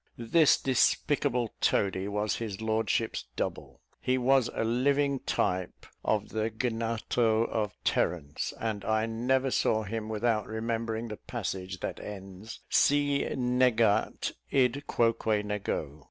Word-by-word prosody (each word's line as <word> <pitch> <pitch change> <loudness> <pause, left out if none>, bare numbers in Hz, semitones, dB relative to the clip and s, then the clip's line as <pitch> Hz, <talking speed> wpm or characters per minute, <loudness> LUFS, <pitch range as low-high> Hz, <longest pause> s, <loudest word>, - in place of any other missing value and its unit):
This 140 +7 +4
despicable 125 -2 +1
toady 95 -1 +1
was 105 +1 -1
his 110 -4 -5
lordship's 110 0 0
double; - - -4 0.2
he 130 0 +1
was 130 -1 +3
a - - 0
living 140 +4 +2
type 90 -1 -1 0.2
of 105 -1 0
the 110 0 -1
Gnatho 115 0 0
of 105 -3 -2
Terence; 75 -5 -1
and 110 -3 -2
I 110 0 +1
never 130 +4 0
saw 110 -2 +2
him 110 +1 -4
without 110 -1 0
remembering 115 +1 -3
the 105 - -6
passage 95 -5 -5
that - - -4
ends 95 +1 -9
"si 145 0 +3 0.2
negat 125 -4 +2 0.2
id 135 +1 +1
quoque 115 -2 +1
nego." 95 -8 -3
115 Hz, 125 wpm, -29 LUFS, 105-125 Hz, 0.2 s, This